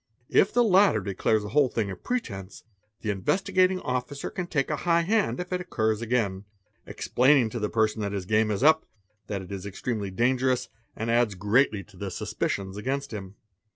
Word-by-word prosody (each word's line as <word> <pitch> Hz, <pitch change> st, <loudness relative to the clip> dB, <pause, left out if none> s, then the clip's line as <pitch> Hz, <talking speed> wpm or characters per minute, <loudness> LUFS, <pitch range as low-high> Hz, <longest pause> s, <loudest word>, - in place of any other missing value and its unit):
If 195 Hz, -, +4 dB
the 245 Hz, -, +4 dB
latter 195 Hz, -, +5 dB
declares 100 Hz, +3 st, 0 dB
_ -, -, -8 dB
the -, -, -5 dB
whole 145 Hz, 0 st, +3 dB
thing 105 Hz, -5 st, -2 dB
a -, -, -5 dB
pretence, 100 Hz, -, -5 dB, 0.4 s
the 105 Hz, -, -1 dB
Investigating 185 Hz, -, +1 dB
Officer 125 Hz, +3 st, -3 dB
can 180 Hz, -1 st, -4 dB
take 150 Hz, -3 st, -1 dB
a 150 Hz, -, 0 dB
high 170 Hz, +1 st, +2 dB
hand 210 Hz, +1 st, +1 dB
if 180 Hz, +1 st, -4 dB
it 180 Hz, -, -1 dB
occurs 110 Hz, -10 st, -1 dB
again, 110 Hz, -5 st, -1 dB, 0.4 s
explaining 130 Hz, -3 st, +3 dB
to 120 Hz, -, -4 dB
the 105 Hz, -1 st, -1 dB
person 110 Hz, -1 st, +1 dB
that 100 Hz, -1 st, -2 dB
his 100 Hz, -2 st, -3 dB
game 110 Hz, +2 st, +2 dB
is 105 Hz, +3 st, -1 dB
up, 160 Hz, +1 st, +5 dB, 0.4 s
that 100 Hz, -2 st, -3 dB
it 95 Hz, -, -11 dB
is 100 Hz, 0 st, -5 dB
ex 95 Hz, -, -9 dB
tremely 110 Hz, -5 st, -2 dB
dangerous, 125 Hz, +5 st, +1 dB, 0.3 s
and 115 Hz, +1 st, -2 dB
adds 115 Hz, -3 st, +2 dB
greatly 105 Hz, +2 st, +2 dB
to -, -, -19 dB
the -, -, -4 dB
suspicions 95 Hz, 0 st, -3 dB
against 135 Hz, +5 st, -3 dB
him. 95 Hz, -2 st, -7 dB
115 Hz, 195 wpm, -26 LUFS, 100-145 Hz, 0.4 s, latter